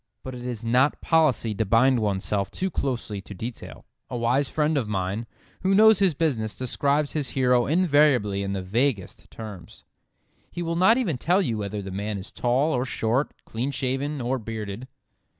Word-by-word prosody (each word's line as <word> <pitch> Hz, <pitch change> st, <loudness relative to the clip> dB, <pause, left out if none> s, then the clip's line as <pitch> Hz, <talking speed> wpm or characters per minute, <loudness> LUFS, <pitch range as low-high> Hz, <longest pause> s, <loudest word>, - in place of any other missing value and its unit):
But 130 Hz, -, -6 dB
it 125 Hz, 0 st, -7 dB
is 120 Hz, -2 st, -5 dB
not 125 Hz, +5 st, +3 dB
policy 155 Hz, -9 st, +2 dB
to 105 Hz, -, 0 dB
bind 120 Hz, +5 st, +4 dB
oneself 100 Hz, -1 st, -1 dB
too 190 Hz, 0 st, -3 dB
closely 120 Hz, -9 st, -3 dB
to 100 Hz, +2 st, -10 dB
detail. 115 Hz, +5 st, -8 dB, 0.2 s
A 125 Hz, -, -4 dB
wise 125 Hz, +4 st, +1 dB
friend 155 Hz, 0 st, +1 dB
of 125 Hz, -7 st, -1 dB
mine, 100 Hz, +3 st, -2 dB, 0.3 s
who 190 Hz, +1 st, +2 dB
knows 220 Hz, 0 st, +7 dB
his 190 Hz, -6 st, +3 dB
business, 125 Hz, -9 st, -1 dB
describes 140 Hz, +3 st, 0 dB
his 145 Hz, -5 st, -2 dB
hero 125 Hz, -2 st, +3 dB
invariably 145 Hz, -, +3 dB
in 100 Hz, 0 st, -2 dB
the 95 Hz, -1 st, -3 dB
vaguest 110 Hz, +1 st, -1 dB
terms. 105 Hz, -5 st, -10 dB, 0.7 s
He 175 Hz, -, -5 dB
will 165 Hz, 0 st, -2 dB
not 190 Hz, +7 st, +5 dB
even 175 Hz, -, -1 dB
tell 180 Hz, +7 st, +2 dB
you 115 Hz, -9 st, -1 dB
whether 100 Hz, 0 st, -4 dB
the 95 Hz, -, -7 dB
man 100 Hz, +2 st, -3 dB
is 95 Hz, +1 st, -9 dB
tall 130 Hz, +6 st, +1 dB
or 125 Hz, -, +1 dB
short, 125 Hz, +1 st, 0 dB, 0.2 s
clean 120 Hz, +5 st, -3 dB
shaven 135 Hz, +1 st, -2 dB
or 125 Hz, +2 st, -1 dB
bearded. 110 Hz, +1 st, -6 dB
125 Hz, 180 wpm, -25 LUFS, 105-145 Hz, 0.7 s, knows